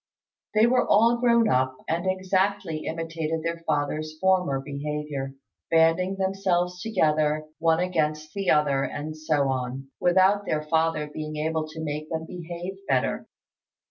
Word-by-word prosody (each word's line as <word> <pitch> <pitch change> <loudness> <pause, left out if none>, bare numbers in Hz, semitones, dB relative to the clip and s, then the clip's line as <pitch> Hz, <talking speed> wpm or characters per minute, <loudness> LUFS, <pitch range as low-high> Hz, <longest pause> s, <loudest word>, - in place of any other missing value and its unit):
They 215 +1 +6
were 250 +1 +3
all 230 +3 +5
grown 235 -2 +4
up, 130 -6 +1
and 170 +3 -1
exactly 185 -3 0
imitated 165 -1 -3
their 170 0 -2
father's 155 +1 -1
former 180 -6 +2
behaviour, 140 -1 -4 0.3
banding 165 +4 +3
themselves 190 -2 0
together 155 -7 +1
one 165 0 +3
against 155 -4 -1
the 195 -1 -1
other, 145 -3 +3
and 155 +3 -4
so 155 -3 +1
on, 130 +1 -3
without 190 +3 +3
their 155 -1 0
father 160 0 +1
being 155 +1 -6
able 155 +1 -1
to 160 +1 -7
make 150 0 -4
them 160 -1 -3
behave 175 +2 -7
better. 130 -1 0
160 Hz, 140 wpm, -26 LUFS, 150-185 Hz, 0.3 s, They